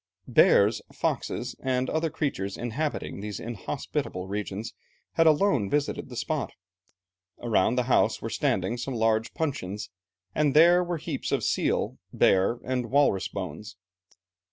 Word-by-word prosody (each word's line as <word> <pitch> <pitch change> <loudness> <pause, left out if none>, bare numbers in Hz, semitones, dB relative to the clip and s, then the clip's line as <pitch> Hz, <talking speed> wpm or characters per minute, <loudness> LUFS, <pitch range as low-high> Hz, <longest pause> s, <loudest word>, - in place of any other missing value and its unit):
Bears, - - +5
foxes, - - -2
and 130 -1 0
other 160 +3 0
creatures 135 -11 -3
inhabiting 120 -2 -3
these 105 -1 -5
inhospitable 100 -4 -4
regions 105 +2 -4 0.4
had 165 - +3
alone 150 - +3
visited 145 -2 -1
the 125 - -8
spot. 145 +5 -2 0.9
Around 115 -1 +2
the 125 - +2
house 125 - +2
were - - -5
standing 120 - 0
some 130 +1 -3
large 110 0 +1
puncheons 105 - -3 0.4
and 150 -2 +1
there 175 +3 +7
were 175 -1 -2
heaps - - -4
of - - +1
seal, - - 0
bear, 95 +5 +3
and 125 -2 -2
walrus 140 -9 +3
bones. - - -6
125 Hz, 130 wpm, -27 LUFS, 105-150 Hz, 0.9 s, there